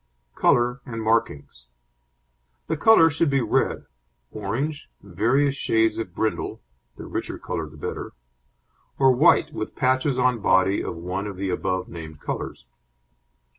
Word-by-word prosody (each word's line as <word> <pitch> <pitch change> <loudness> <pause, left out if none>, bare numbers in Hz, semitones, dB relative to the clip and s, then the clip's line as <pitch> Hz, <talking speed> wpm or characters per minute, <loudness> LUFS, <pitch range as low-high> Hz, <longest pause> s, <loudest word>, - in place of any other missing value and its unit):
COLOUR 125 +2 +2
AND 115 -2 -6
MARKINGS 70 - -1 1.0
The - - -1
colour 165 -8 +6
should 160 +1 +1
be 135 -1 +2
red, 115 - 0 0.5
orange, 130 +9 -4
various 120 +9 +1
shades 115 -5 +1
of 95 -6 -6
brindle 110 -1 -2 0.4
(the - - -8
richer - - -4
colour 80 - -4
the 75 - -15
better), - - -5 0.8
or 135 -1 +5
white 155 +3 +4
with 110 - -5
patches 130 +1 +1
on 125 -2 +2
body 95 0 +2
of - - -4
one 90 +4 -4
of 100 -2 -7
the 95 0 -2
above 95 0 -2
named 80 -3 -9
colours. 65 - -5
110 Hz, 135 wpm, -24 LUFS, 95-130 Hz, 1.0 s, colour